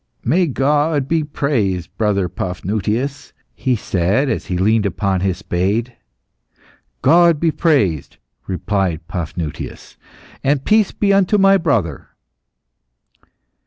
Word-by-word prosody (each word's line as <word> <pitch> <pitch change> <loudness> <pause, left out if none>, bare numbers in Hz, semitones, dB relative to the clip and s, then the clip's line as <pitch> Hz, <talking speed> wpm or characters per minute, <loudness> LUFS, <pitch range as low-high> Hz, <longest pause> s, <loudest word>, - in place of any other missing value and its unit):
"May 170 +8 +2
God 145 +1 +1
be 160 0 +1
praised, 115 - -2
brother 100 -4 +1
Paphnutius," 105 +9 -3 0.2
he 130 -2 0
said, 100 +7 0
as 115 - -3
he 90 - -2
leaned 105 +3 +2
upon 95 -2 -1
his 95 -2 0
spade. 105 +7 -1 1.1
"God 170 -2 +5
be 165 0 +2
praised!" 105 - 0 0.3
replied 95 -4 -2
Paphnutius. 80 -1 -6 0.5
"And 140 0 +1
peace 215 -2 +3
be 200 -1 +1
unto 195 +1 +3
my 195 0 +5
brother." 115 - -1
115 Hz, 110 wpm, -18 LUFS, 95-150 Hz, 1.1 s, God